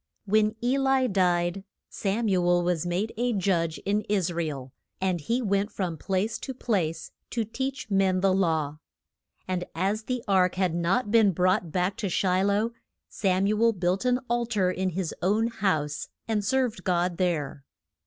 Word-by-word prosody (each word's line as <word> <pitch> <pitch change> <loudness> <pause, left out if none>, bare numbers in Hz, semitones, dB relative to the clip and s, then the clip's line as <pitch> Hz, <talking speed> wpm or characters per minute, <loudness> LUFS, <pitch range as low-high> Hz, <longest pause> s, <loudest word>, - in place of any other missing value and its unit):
WHEN 215 +1 +2
E 255 +3 +2
li 270 -1 +3
died, 180 -2 +1 0.2
Sam 215 +3 -1
u 185 -3 +2
el 175 0 +3
was 175 -1 0
made 185 +6 -1
a 245 +1 +1
judge 175 -5 0
in 205 +1 +1
Is 190 -4 +1
ra 170 0 -1
el. 135 -4 -6 0.3
And 185 -3 0
he 235 - -1
went 200 0 0
from 180 -4 -3
place 195 +3 -1
to 265 - -6
place 170 -10 -1 0.2
to 230 -2 -1
teach 265 +1 -4
men 190 -1 +2
the 195 -1 +3
law. 160 -5 0 0.7
And 185 -1 -1
as 200 +5 -1
the 250 -2 -2
ark 185 -2 +3
had 185 -3 +1
not 190 +7 0
been 220 -4 +5
brought 180 0 +1
back 180 +3 0
to 205 - -2
Shi 185 +1 +1
loh, 205 +3 +1 0.4
Sam 190 -1 +1
u 210 +2 +1
el 230 0 +5
built 180 +1 0
an 250 0 +2
al 240 0 0
tar 200 -6 +1
in 185 +1 -1
his 180 -2 -3
own 210 +6 +2
house 160 -9 -1 0.2
and 215 -2 0
served 240 -3 0
God 175 -1 0
there. 150 -7 -1
190 Hz, 180 wpm, -27 LUFS, 175-215 Hz, 0.7 s, been